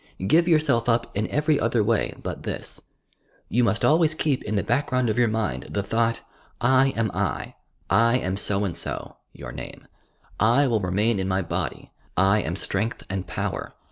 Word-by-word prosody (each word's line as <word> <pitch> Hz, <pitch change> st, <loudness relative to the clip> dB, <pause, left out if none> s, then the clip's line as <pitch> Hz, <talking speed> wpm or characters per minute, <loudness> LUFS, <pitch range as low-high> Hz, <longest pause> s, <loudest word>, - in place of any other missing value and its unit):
Give 165 Hz, -, +4 dB
yourself 150 Hz, -8 st, +3 dB
up 115 Hz, 0 st, 0 dB
in 105 Hz, +2 st, 0 dB
ever; 150 Hz, 0 st, +1 dB
other 115 Hz, -1 st, +2 dB
way 115 Hz, +1 st, 0 dB
but -, -, -5 dB
this. -, -, -5 dB, 0.7 s
You 120 Hz, +2 st, +2 dB
muat 115 Hz, -1 st, +1 dB
always 155 Hz, 0 st, +4 dB
keep 145 Hz, -4 st, 0 dB
in 110 Hz, -, -3 dB
the 100 Hz, -, +1 dB
background 125 Hz, -1 st, +1 dB
of 110 Hz, -, -3 dB
your 120 Hz, -, +4 dB
mind 110 Hz, -, -2 dB
the 100 Hz, -, -2 dB
thought: 115 Hz, +3 st, 0 dB, 0.3 s
— -, -, -37 dB, 0.2 s
"I 135 Hz, -, +5 dB
am 110 Hz, -3 st, +1 dB
I... -, -, -2 dB, 0.3 s
I 115 Hz, +2 st, +4 dB
am 95 Hz, -6 st, -2 dB
so 100 Hz, 0 st, 0 dB
and 90 Hz, -4 st, -3 dB
so -, -, -5 dB
(your -, -, -9 dB
name)... -, -, -9 dB, 0.5 s
I 120 Hz, +6 st, +4 dB
will 115 Hz, -4 st, +2 dB
remain 100 Hz, +3 st, +1 dB
in 95 Hz, -, -1 dB
my 95 Hz, 0 st, 0 dB
body.... 85 Hz, -3 st, -4 dB, 0.3 s
I 100 Hz, +3 st, +4 dB
am 85 Hz, -1 st, -3 dB
strength 100 Hz, +3 st, -2 dB
and 95 Hz, -2 st, -3 dB
power -, -, -4 dB
110 Hz, 185 wpm, -24 LUFS, 100-125 Hz, 0.7 s, I